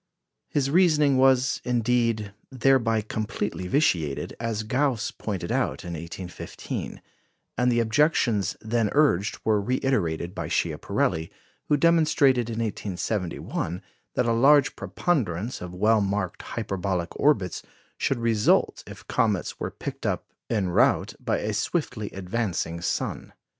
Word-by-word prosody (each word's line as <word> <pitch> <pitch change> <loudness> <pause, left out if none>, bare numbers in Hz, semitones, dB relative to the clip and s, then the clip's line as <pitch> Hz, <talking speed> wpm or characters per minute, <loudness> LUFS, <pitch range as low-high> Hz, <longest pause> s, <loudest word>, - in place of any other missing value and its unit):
His 140 -2 0
reasoning 150 -5 +4
was, 130 0 +3
indeed, 115 -3 0 0.2
thereby 125 -4 +3
completely 105 -3 -3
vitiated, 85 - 0
as 115 -2 -2
Gauss 125 0 0
pointed 95 -5 -4
out - - -1
in 85 - -5
1815; 85 +2 -6 0.5
and 125 +1 +2
the 120 - +2
objections 115 - +2
then 110 0 0
urged 115 - +2
were 105 -2 +3
reiterated 100 -8 -1
by 85 -5 -4
Schiaparelli, 80 0 -1 0.4
who 150 - +2
demonstrated 150 -6 +3
in 115 - -3
1871 95 -3 -3 0.3
that - - +2
a 115 - +2
large 140 +4 +5
preponderance 100 - -1
of 90 0 -6
well 105 +3 +3
marked 100 -2 -2
hyperbolic 95 -5 -3
orbits 120 - +2 0.3
should 135 - 0
result 115 -2 +2
if - - -11
comets 105 -6 0
were - - -2
picked - - -6
up - - -1 0.2
en 100 -5 0
route 85 - +3
by - - +1
a 105 +1 -2
swiftly 110 - -2
advancing 95 -4 -3
sun. - - -3
110 Hz, 125 wpm, -26 LUFS, 95-130 Hz, 0.5 s, large